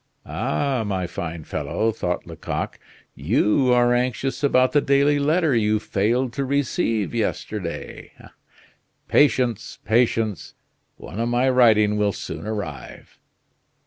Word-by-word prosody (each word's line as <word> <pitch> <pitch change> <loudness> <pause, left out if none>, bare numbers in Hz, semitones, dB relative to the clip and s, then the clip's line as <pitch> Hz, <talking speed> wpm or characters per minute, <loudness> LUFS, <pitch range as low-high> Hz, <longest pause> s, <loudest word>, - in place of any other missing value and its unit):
"Ah! 130 - -1
my 95 -3 -2
fine 85 -1 -6
fellow," 80 +10 -2
thought 90 -5 -3
Lecoq, - - -5 0.3
"you 125 +5 +2
are 120 0 +4
anxious 125 +2 -1
about 130 -2 +3
the 145 - +3
daily 140 +1 +3
letter 155 +1 +2
you 110 -1 +2
failed 115 +5 0
to 140 - -2
receive 130 -6 -1
yesterday. 105 -5 -4 1.0
Patience, 125 -6 +2
patience! 110 -4 0 0.4
One 100 - -9
of 115 +1 0
my 120 +2 +2
writing 110 -4 +4
will 105 -1 +1
soon 105 - -7
arrive." 90 - -7
115 Hz, 115 wpm, -22 LUFS, 105-130 Hz, 1.0 s, are